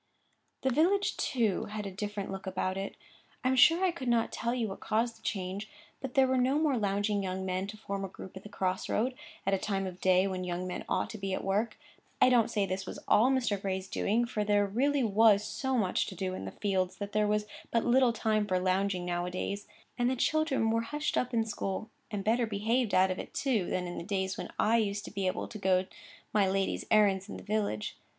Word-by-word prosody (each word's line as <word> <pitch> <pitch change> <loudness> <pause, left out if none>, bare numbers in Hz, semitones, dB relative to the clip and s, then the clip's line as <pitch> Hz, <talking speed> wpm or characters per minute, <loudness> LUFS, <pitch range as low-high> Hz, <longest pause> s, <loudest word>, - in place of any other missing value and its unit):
The 265 - +2
village, 365 +9 +2
too, 225 -7 0
had 210 0 -5
a 195 - -4
different 205 0 -4
look 195 0 -6
about 185 0 -1
it. 195 +1 -5 0.5
I 255 - +2
am 260 - +3
sure 340 +7 +6
I 365 - +3
could 280 -7 -6
not 235 -1 +2
tell 235 - -2
you 240 -3 -1
what 195 - -7
caused 230 +2 -1
the - - -26
change; 195 +1 -3 0.3
but 265 -2 -6
there 270 -1 +6
were 260 0 +2
no 260 +3 +3
more 305 -3 +2
lounging 205 -1 0
young 190 0 -3
men 185 +1 -1
to 215 +1 -8
form 200 -2 -4
a - - -2
group 190 0 -11
at 190 - -7
the 210 - -11
cross 185 -2 -2
road, 250 +4 +1 0.3
at 195 - +2
a 195 - +2
time 195 -1 -1
of 185 -1 -7
day 185 0 +4
when 185 -1 -2
young 180 0 -3
men 180 - -5
ought - - 0
to 220 - -7
be 195 -1 -1
at - - -5
work. 210 +4 0 0.4
I - - +6
don't 240 -3 +4
say 205 -2 +1
this 190 0 -3
was - - -6
all 230 +5 +5
Mr. 240 -7 +1
Gray's 190 -1 -2
doing, 225 +5 +1
for 215 -3 -2
there 205 0 +3
really 265 +7 +1
was 215 -1 +5
so 265 +3 -1
much 190 -5 +1
to 190 - -7
do 185 0 -2
in 95 - -5
the 95 - -5
fields 190 -3 -1
that 205 0 -6
there 210 0 +2
was 210 0 +1 0.2
but 230 - +1
little 250 0 +5
time 215 -2 0
for 185 -2 +1
lounging 185 0 0
now 175 0 -1
a - - -2
days. 200 +3 -4 0.3
And 245 0 +3
the 260 - 0
children 270 -4 +1
were 230 0 +2
hushed 295 +6 -2
up 250 - 0
in 225 -2 +1
school, 215 0 -4 0.2
and 205 -2 -3
better 230 +2 +2
behaved 220 +3 0
out 185 0 +5
of 185 - -3
it, - - -8
too, 235 -10 +1
than 180 - -1
in 175 - -5
the - - -6
days 190 0 -1
when - - -6
I 230 +2 +3
used 205 -2 -1
to - - -8
be 195 -1 -1
able 185 - -2
to 215 - -8
go 185 -1 +2 0.5
my 200 -3 +3
lady's 195 0 0
errands 205 -2 +3
in - - -6
the - - -10
village. 200 - -1
205 Hz, 245 wpm, -31 LUFS, 190-235 Hz, 0.5 s, sure